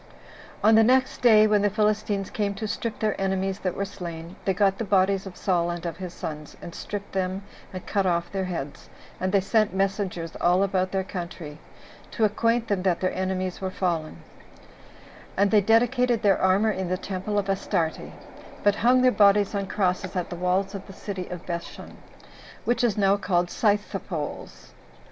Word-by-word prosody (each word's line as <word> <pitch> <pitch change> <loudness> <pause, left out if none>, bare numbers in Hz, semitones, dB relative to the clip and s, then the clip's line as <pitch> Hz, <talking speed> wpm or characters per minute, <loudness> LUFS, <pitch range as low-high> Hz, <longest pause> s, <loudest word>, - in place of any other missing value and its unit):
8. - - -20
On - - +6
the 220 0 +7
next 260 +3 +2
day, 215 -3 +7
when 210 -1 +3
the 205 - +3
Philistines 210 -1 0
came 200 -2 -1
to 215 +2 -4
strip 225 +1 -3
their 215 -2 -1
enemies 190 0 -1
that 185 -2 -2
were 200 - -1
slain, 170 -2 -8
they 195 - +3
got 195 0 +2
the - - -1
bodies 195 -1 +2
of 185 - -10
Saul 175 -3 +1
and 175 0 -4
of 170 -1 -4
his 180 -1 -6
sons, 150 -3 -7
and 170 - -9
stripped 205 -1 -6
them, 190 +1 -2 0.3
and 185 -1 -7
cut 200 -2 0
off 170 -1 0
their 195 -1 -2
heads; 150 -6 -6 0.3
and 185 0 -1
they 200 - +4
sent 215 0 +1
messengers 190 -4 -2
all 180 +2 +4
about 185 -2 0
their 190 -1 0
country, 170 -5 -7 0.5
to 225 - -2
acquaint 230 +2 +2
them 200 -3 0
that 180 -2 +1
their 185 - 0
enemies 185 0 -2
were 190 - -1
fallen; 170 -4 -2 1.1
and 200 +1 +3
they 210 -2 +5
dedicated 235 +2 +2
their 200 -2 +3
armor 195 +4 +3
in 190 -3 -3
the 185 - 0
temple 195 +2 -3
of 200 -1 0
Astarte, 190 -4 -1 0.5
but 205 0 +3
hung 250 +3 +4
their 255 - +6
bodies 205 -2 +4
on 200 -1 -2
crosses 185 -1 -1
at 180 -2 -2
the - - -3
walls 185 +3 0
of 195 -1 -7
the 195 - -10
city 190 -2 -5 0.2
Bethshun, 170 -1 -6 0.7
which 240 +1 +1
is 225 -4 +2
now 200 0 +3
called 175 -3 0
Scythepolls. 200 -7 -2
195 Hz, 185 wpm, -25 LUFS, 180-210 Hz, 1.1 s, the